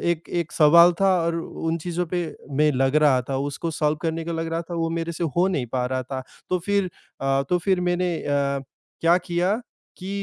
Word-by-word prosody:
एक 170 -1 -3
एक 170 -3 -2
सवाल 170 +3 +7
था 195 -1 +4
और 165 0 0
उन 165 0 -3
चीज़ों 175 0 -2
पे 175 -1 0 0.4
मैं 150 - +5
लग 135 +3 +2
रहा 130 -4 +5
था 135 - 0
उसको 165 +3 -4
सॉल्व 150 0 +2
करने 165 -1 -2
को 170 - -3
लग 165 0 -2
रहा 165 +1 -1
था - - -3
वो 165 -1 -1
मेरे 170 +1 -3
से 170 +1 -3
हो 180 +2 +4
नहीं 145 -10 -1
पा 125 -1 0
रहा 130 0 -2
था 130 +1 -5 0.3
तो 180 - +2
फिर 200 -2 +1 0.3
अ, 135 0 +1
तो 180 - +3
फिर 185 +1 +1
मैंने 175 0 0
अ, 140 -1 0 0.4
क्या 170 +2 +4
किया? 180 +5 0 0.4
कि 185 +1 -7
165 Hz, 215 wpm, -24 LUFS, 145-175 Hz, 0.4 s, सवाल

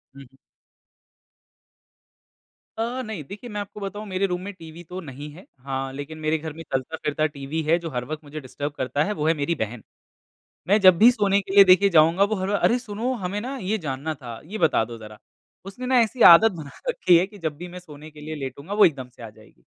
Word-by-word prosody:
हुँ, 140 - -11
हुँ। 135 +1 -22 2.4
अ, 235 +3 -2
नहीं 215 -8 -6
देखिए 205 - -10
मैं 210 -1 -5
आपको 205 +1 -9
बताऊँ 205 +1 -6
मेरे 190 0 0
रूम 180 -1 -3
में 200 +2 -7
टीवी 165 -1 -12
तो 180 +3 -8
नहीं 145 -1 -9
है। 175 +6 -14 0.2
हाँ, 135 -1 -3
लेकिन 145 +3 -7
मेरे 155 +1 0
घर 155 -1 -7
में 165 - -9
चलता-फिरता 150 +3 -1
टीवी 140 +3 -4
है, 160 +3 +3
जो 170 -1 -6
हर 125 -4 -4
वक़्त 155 +3 -6
मुझे 150 +1 -8
डिस्टर्ब 145 +1 -5
करता 135 +3 0
है 210 - -2
वो 150 - 0
है 165 - +4
मेरी 155 +2 -1
बहन। 110 +1 -4 0.8
मैं 205 +3 +4
जब 185 -3 +7
भी 225 +7 +8
सोने 200 -4 +2
के 195 0 -7
लिए 200 - +10
देखिए 190 +1 +5
जाऊँगा, 165 +2 +4
वो 210 +2 0
हर 190 -1 -3
बा 205 - +1
अरे! 235 - +3
सुनो 235 +2 -3
हमें 190 +3 -2
ना 265 +4 -5
ये 215 -2 -2
जानना 140 +4 -3
था, 120 -4 -9
ये 205 +7 -6
बता 150 - +2
दो 115 0 -9
जरा, 110 -1 -12 0.5
उसने 195 +6 -8
ना 255 0 +3
ऐसी 235 +2 -2
आदत 220 +6 +6
बना 145 -3 -9 0.2
रखी 185 - +4
है 175 - +2
कि 205 +1 -15
जब 150 -2 -6
भी 175 +3 -7
मैं 180 +1 -9
सोने 155 -3 -13
के 150 0 -14
लिए 155 +1 -6
लेटूँगा, 140 +5 -6
वो 210 0 +6
एकदम 135 -6 -1
से 125 -1 -15
आ 115 - -7
जाएगी। 110 - -21
165 Hz, 230 wpm, -24 LUFS, 145-200 Hz, 2.4 s, लिए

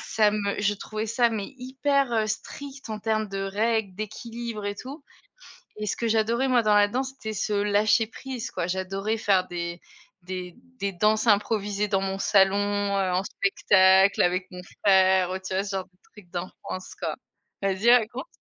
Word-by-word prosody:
ça 210 -2 +2
me 200 -1 -1
je 205 0 +1
trouvais 215 +2 -5
ça 235 +1 +2
mais 215 -1 -5
hyper, 270 +1 0
heu, 220 -1 +1
strict 275 +3 -6
en 215 - -3
termes 215 0 -1
de 195 - -5
règles, 210 0 0
d'équilibre 220 +1 -6
et 205 - -2
tout 275 +7 -9 0.7
et 215 0 -4
ce 200 - -1
que 235 - -1
j'adorais 230 +4 +1
moi 245 -2 +4
dans 210 -1 +3
la 205 0 +5
danse, 260 +5 -2
c'était 220 -5 -6
ce 210 0 -2
lâcher 210 +2 +3
prise 255 +1 -6
quoi, 170 - -3
j'adorais 195 +4 -2
faire 195 -4 +2
des 170 0 -5 0.4
des 180 -1 -6 0.2
des 200 0 -2
danses 215 +4 +2
improvisées 210 -1 +1
dans 195 -1 +1
mon 195 0 -2
salon, 195 0 +4 0.4
heu, 185 -2 0
en 185 - +1
spectacle 190 0 +4
avec 185 +1 +2
mon 180 - -8 0.2
frère, 190 -2 +4
heu, 190 - -3
tu 185 0 -5
vois 195 +1 0
ce 200 - -6
genre 190 - -3
de 180 -1 -36
trucs 205 -5 -16
d'enfance, 185 +1 -6
quoi - - -2 0.5
vas-y, 195 +4 +2
raconte. 245 +4 +3
205 Hz, 185 wpm, -26 LUFS, 190-225 Hz, 0.7 s, la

